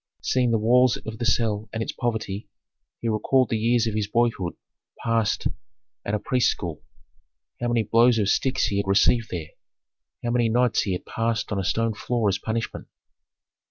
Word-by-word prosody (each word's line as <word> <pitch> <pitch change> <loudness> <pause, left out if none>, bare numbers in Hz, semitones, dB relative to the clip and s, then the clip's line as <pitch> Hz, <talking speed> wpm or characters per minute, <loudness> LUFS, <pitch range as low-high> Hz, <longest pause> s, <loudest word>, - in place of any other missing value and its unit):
Seeing 125 -2 +2
the 115 - +3
walls 125 +2 +4
of 110 -1 -6
the 120 - -2
cell 110 -2 0
and 110 0 -2
its - - -4
poverty, 110 -4 -3 0.5
he 115 - -2
recalled 115 +4 +2
the 115 - 0
years 120 +1 +2
of 110 - -1
his 105 -1 -1
boyhood 110 -6 0 0.4
passed 115 -2 0 0.6
at 105 - -1
a - - +2
priests' 125 +3 +2
school. 85 -5 -4 0.8
How 120 - 0
many 120 -1 +2
blows 115 +3 +4
of 105 -3 +1
sticks 130 +5 +1
he 100 -1 -1
had 100 - -1
received 105 +3 +3
there, 80 -4 -5 0.7
how 120 - -1
many 120 -1 +2
nights 120 +1 +2
he 95 - -1
had 90 - -5
passed 115 -1 -2
on 100 - 0
a - - -1
stone 110 +3 0
floor 115 0 0
as 95 - -1
punishment! 115 +1 -4
115 Hz, 185 wpm, -24 LUFS, 105-120 Hz, 0.8 s, walls